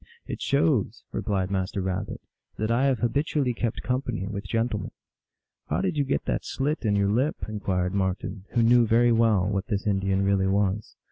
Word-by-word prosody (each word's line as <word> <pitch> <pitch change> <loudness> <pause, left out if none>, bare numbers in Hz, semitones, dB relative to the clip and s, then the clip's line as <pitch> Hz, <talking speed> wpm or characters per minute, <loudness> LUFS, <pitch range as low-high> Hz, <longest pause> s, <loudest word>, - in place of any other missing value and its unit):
" 470 - -40
It - - -6
shows," 140 -7 +1
replied 95 -2 -1
Master 95 +1 -1
Rabbit, 95 +2 -3 0.2
" - - -43
that 110 +1 -1
I 125 +4 +3
have 135 -4 +1
habitually 140 +1 +1
kept 115 -1 -3
company 125 -6 -2
with 100 0 -5
gentlemen." 115 0 -1 0.4
" - - -59
How - - 0
did - - 0
you 145 - +2
get 135 0 -1
that - - -1
slit 145 +2 -2
in 105 -1 +2
your 100 0 +2
lip? 130 +8 +1
" - - -3
inquired 95 -4 -1
Marten, 95 0 -2
who 120 - +3
knew 120 0 +5
very 120 +2 +4
well 110 -5 +3
what 100 0 -1
this 105 -1 -2
Indian 95 -1 +1
really 100 -1 +2
was. 100 +1 0
105 Hz, 200 wpm, -26 LUFS, 95-120 Hz, 0.4 s, knew